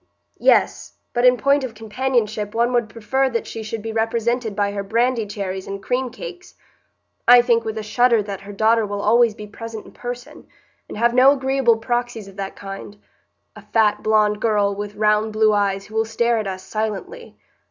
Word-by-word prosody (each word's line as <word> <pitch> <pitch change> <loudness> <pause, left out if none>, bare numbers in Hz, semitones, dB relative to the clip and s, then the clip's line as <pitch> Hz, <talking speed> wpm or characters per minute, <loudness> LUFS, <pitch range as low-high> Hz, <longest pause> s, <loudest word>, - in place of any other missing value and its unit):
"Yes, - - +2 0.2
but 240 +1 +1
in 250 0 +6
point 280 +2 +2
of 240 -4 -5
companionship 220 -2 -2
one 235 +2 +1
would 235 -3 +1
prefer 265 +5 0
that 235 -2 -2
she 225 - -7
should 215 0 -5
be 225 - -4
represented 225 0 -1
by 200 -1 0
her 200 0 -3
brandy 230 +2 0
cherries 190 -2 -5
and 195 0 -5
cream 255 0 -1
cakes. 360 +9 -10 0.7
I 245 0 +8
think 235 -1 +2
with 220 0 -4
a 220 - -3
shudder 235 +1 +3
that 200 -1 -6
her 200 - -10
daughter 220 +2 +2
will 205 -1 -4
always 230 0 +4
be 210 - -8
present 225 +1 -8
in - - -14
person, 245 0 -8 0.4
and - - -7
have 235 +2 +2
no 260 +3 +6
agreeable 265 -4 +2
proxies 240 -2 -3
of 195 0 -14
that 195 -1 -5
kind,—a 200 +1 -12
fat, 215 -2 +1
blond 210 -1 +2
girl, 205 -3 +2
with 205 +1 -6
round 215 0 +1
blue 215 0 +3
eyes, 200 -1 0
who 215 - -15
will 220 0 +1
stare 235 +1 +1
at 215 - -3
us 185 -1 -5
silently." 220 - -5
220 Hz, 190 wpm, -21 LUFS, 210-240 Hz, 0.7 s, I